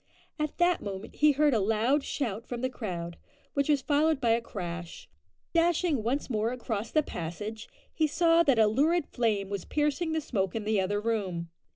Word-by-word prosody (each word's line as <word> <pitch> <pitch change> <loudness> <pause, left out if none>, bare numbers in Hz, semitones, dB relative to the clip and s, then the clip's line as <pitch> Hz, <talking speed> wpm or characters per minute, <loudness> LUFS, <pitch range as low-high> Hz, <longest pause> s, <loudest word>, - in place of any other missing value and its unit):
At 305 -1 -2
that 350 0 +3
moment 200 0 -7
he 300 0 +5
heard 295 0 +3
a 225 - +3
loud 225 +8 +2
shout 230 -7 -3
from 240 -1 -4
the 255 0 -1
crowd, 175 -8 -5 0.4
which 280 +1 0
was 290 -3 +3
followed 300 0 +2
by 235 -4 +2
a 230 +1 +3
crash. 175 -6 -6 0.5
Dashing 335 -4 +2
once 250 +6 -1
more 225 -1 0
across 230 -3 -3
the 310 - +2
passage, 210 - -6 0.2
he 315 -1 +2
saw 330 +2 +4
that 275 -7 +3
a 220 - +6
lurid 290 +10 +2
flame 210 -7 -1
was 200 -3 -3
piercing 300 +2 0
the 320 - +1
smoke 195 -9 -2
in 220 - -2
the 210 -1 +1
other 205 +2 0
room. 190 -7 -2
235 Hz, 190 wpm, -29 LUFS, 205-295 Hz, 0.5 s, a